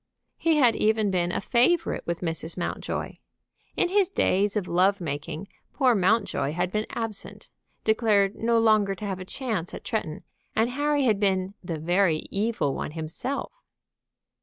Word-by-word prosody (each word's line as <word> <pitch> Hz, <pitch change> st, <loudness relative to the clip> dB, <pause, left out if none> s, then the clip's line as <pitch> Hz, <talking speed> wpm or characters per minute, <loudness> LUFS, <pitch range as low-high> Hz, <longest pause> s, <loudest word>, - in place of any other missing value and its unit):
He 330 Hz, -1 st, +3 dB
had 250 Hz, -6 st, +4 dB
even 215 Hz, -1 st, +2 dB
been 175 Hz, -1 st, +1 dB
a -, -, -1 dB
favorite 255 Hz, -, +2 dB
with 170 Hz, 0 st, -2 dB
Mrs. 165 Hz, -1 st, -3 dB
Mountjoy. 175 Hz, -, -4 dB, 0.6 s
In -, -, +2 dB
his 390 Hz, -1 st, +3 dB
days 200 Hz, -, +1 dB
of 200 Hz, -4 st, -1 dB
love 190 Hz, +4 st, +3 dB
making 155 Hz, +2 st, -5 dB, 0.3 s
poor 260 Hz, -4 st, +3 dB
Mountjoy 195 Hz, -8 st, +1 dB
had 180 Hz, +2 st, -1 dB
been 215 Hz, +1 st, -1 dB
absent, 225 Hz, -3 st, -5 dB, 0.3 s
declared 215 Hz, -3 st, +3 dB
no 230 Hz, +1 st, +1 dB
longer 215 Hz, -3 st, +3 dB
to 210 Hz, -, -7 dB
have 190 Hz, -2 st, -3 dB
a 185 Hz, -, -7 dB
chance 215 Hz, -6 st, -3 dB
of -, -, -9 dB
Tretton, 170 Hz, -8 st, -3 dB, 0.3 s
and 225 Hz, +3 st, +2 dB
Harry 290 Hz, +2 st, +1 dB
had 220 Hz, -6 st, +2 dB
been 190 Hz, -1 st, +1 dB
the 170 Hz, -3 st, -4 dB
very 170 Hz, 0 st, +1 dB
evil 200 Hz, -9 st, 0 dB
one 150 Hz, -, -4 dB
himself. 165 Hz, -, -4 dB
200 Hz, 160 wpm, -26 LUFS, 175-230 Hz, 0.6 s, had